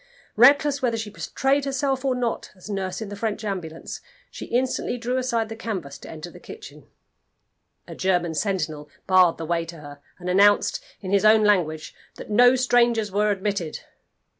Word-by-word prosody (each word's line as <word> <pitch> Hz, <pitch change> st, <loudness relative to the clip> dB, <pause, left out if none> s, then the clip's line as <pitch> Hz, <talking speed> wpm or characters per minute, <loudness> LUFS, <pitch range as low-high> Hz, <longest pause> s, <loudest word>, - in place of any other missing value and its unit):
Reckless 280 Hz, +4 st, +5 dB
whether 235 Hz, -3 st, 0 dB
she 220 Hz, -2 st, -5 dB
betrayed 270 Hz, +6 st, 0 dB
herself 270 Hz, -1 st, -1 dB
or 265 Hz, -2 st, +1 dB
not 245 Hz, -2 st, -2 dB
as 190 Hz, +3 st, -10 dB
nurse 190 Hz, 0 st, -3 dB
in 215 Hz, -, -5 dB
the 205 Hz, -, -6 dB
French 220 Hz, +1 st, -3 dB
ambulance, 170 Hz, -5 st, -5 dB, 0.3 s
she -, -, -8 dB
instantly 250 Hz, 0 st, -1 dB
drew 245 Hz, +2 st, -2 dB
aside 235 Hz, -3 st, 0 dB
the 225 Hz, -, -7 dB
canvas 185 Hz, -12 st, -5 dB
to -, -, -11 dB
enter 160 Hz, +2 st, -8 dB
the -, -, -13 dB
kitchen. 440 Hz, -, -12 dB, 1.0 s
A -, -, -8 dB
German 175 Hz, -3 st, 0 dB
sentinel 155 Hz, -5 st, -2 dB, 0.2 s
barred 185 Hz, -3 st, +4 dB
the 165 Hz, -, -5 dB
way 170 Hz, +1 st, 0 dB
to 165 Hz, 0 st, -10 dB
her, 145 Hz, -1 st, -12 dB, 0.2 s
and 180 Hz, -, -9 dB
announced, 200 Hz, +3 st, +3 dB, 0.2 s
in 185 Hz, -, -5 dB
his 200 Hz, 0 st, +3 dB
own 215 Hz, 0 st, +6 dB
language, 170 Hz, -7 st, +1 dB, 0.2 s
that -, -, -10 dB
no 245 Hz, +4 st, +6 dB
strangers 240 Hz, -4 st, +2 dB
were 210 Hz, +2 st, +1 dB
admitted. 195 Hz, -5 st, -2 dB
205 Hz, 175 wpm, -24 LUFS, 180-245 Hz, 1.0 s, own